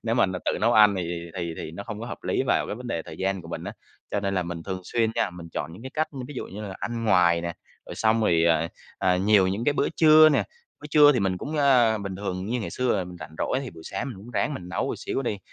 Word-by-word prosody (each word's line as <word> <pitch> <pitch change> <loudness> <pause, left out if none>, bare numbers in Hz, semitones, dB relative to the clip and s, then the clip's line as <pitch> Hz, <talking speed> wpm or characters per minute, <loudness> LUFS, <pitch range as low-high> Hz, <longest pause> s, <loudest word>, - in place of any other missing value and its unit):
nếu 115 0 0
mà 120 - +4
nà 95 -1 -3
tự - - +1
nấu 115 +2 +3
ăn 105 -2 +6
thì - - -1
thì 85 0 -5
thì 85 -3 -4
thì - - -5
nó 85 +5 -7
hông 110 -2 -6
có 115 - -5
hợp - - -6
lý - - +1
vào - - +2
cái - - -4
vấn 125 +1 -8
đề 85 -9 -2
thời 80 - -10
gian 95 -1 -1
của 85 - -11
mình 85 0 -5
á. 100 - -5 0.4
Cho 100 - 0
nên 100 -1 -1
là 90 - +1
mình 85 -1 -6
thường 95 0 -4
xuyên 115 +1 +1
nha, - - 0
mình 90 -1 -10
chọn 75 - -4
những 90 - -11
cái 130 - -7
cách, 155 0 0
ư, 135 - -8
ví 145 - -8
dụ - - -5
như 105 +3 -8
là 100 -2 -6
ăn 115 0 -4
ngoài 85 -4 +4
nè, 85 0 -3 0.3
rồi - - -7
xong 110 +1 +2
rồi, 85 -6 +3
ờ, 80 -1 +3 0.3
ờ, 90 -1 +2
nhiều 95 0 +4
những 100 +5 -2
cái 145 - +3
bữa - - +1
trưa 155 -1 +8
nè, 145 - +2 0.4
bữa - - -8
trưa 150 -1 +7
thì 125 - 0
mình 95 -2 0
cũng 150 +7 -4
ơ, 125 -6 +4
bình 100 -2 -5
thường 95 -1 -4
như 125 +2 -1
ngày 110 - -4
xưa 125 -4 0
là 95 - -2
mình 90 0 -10
rảnh 80 - -9
rỗi 130 - 0
thì 130 - -6
buổi 80 - -13
sáng 95 +8 -4
mình 120 - -7
cũng 110 +5 -11
ráng 145 +4 -1
mình 90 -9 -7
nấu 90 - -2
một - - -3
xíu 135 - -3
đi. 105 -5 -2
100 Hz, 315 wpm, -25 LUFS, 90-120 Hz, 0.4 s, trưa